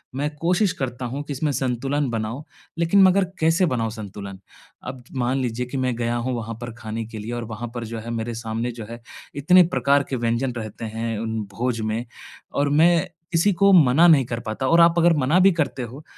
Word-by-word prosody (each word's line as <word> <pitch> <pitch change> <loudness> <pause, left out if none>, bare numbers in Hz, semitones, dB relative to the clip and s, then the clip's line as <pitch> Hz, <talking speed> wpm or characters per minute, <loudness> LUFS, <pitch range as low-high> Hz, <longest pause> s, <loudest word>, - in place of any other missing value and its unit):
मैं 145 +2 -1
कोशिश 180 +5 +1
करता 125 -1 -3
हूँ 135 +4 -4
कि 145 - -5
इसमें 145 +2 -1
संतुलन 135 +2 -1
बनाऊँ, 115 +5 -3 0.4
लेकिन 180 +4 +4
मगर 190 +1 +4
कैसे 165 +3 +3
बनाऊँ 115 -8 -1
संतुलन? 100 -3 -8 0.4
अब 125 -1 -8
मान 125 +1 0
लीजिए 125 0 -2
कि 135 - -5
मैं 130 -2 0
गया 120 0 -1
हूँ 125 +2 -2
वहाँ 115 -1 -5
पर 120 -2 -6
खाने 110 0 -5
के 110 0 -9
लिए 110 +3 -6
और 120 0 -3
वहाँ 120 +3 -5
पर 120 -1 -4
जो 115 +1 -6
है 115 +2 -8
मेरे 115 0 -3
सामने 115 +1 -3
जो 115 -2 -8
है, 115 0 -9 0.3
इतने 180 +6 +6
प्रकार 140 -4 +2
के 135 - -1
व्यंजन 120 +2 -1
रहते 110 0 -6
हैं 115 0 -3
उन 110 0 -3 0.2
भोज 120 -2 -1
में 110 +2 -2 0.5
और 145 0 +1
मैं 165 +3 +4 0.3
किसी 170 +5 +3
को 200 +2 +5
मना 160 0 +6
नहीं 150 -6 +5
कर 115 0 -4
पाता। 120 +5 -2
और 170 0 +5
आप 170 0 +5
अगर 170 0 +5
मना 145 +6 +3
भी 195 +1 +6
करते 135 -6 -2
हो 125 +6 -9
125 Hz, 215 wpm, -23 LUFS, 115-150 Hz, 0.5 s, इतने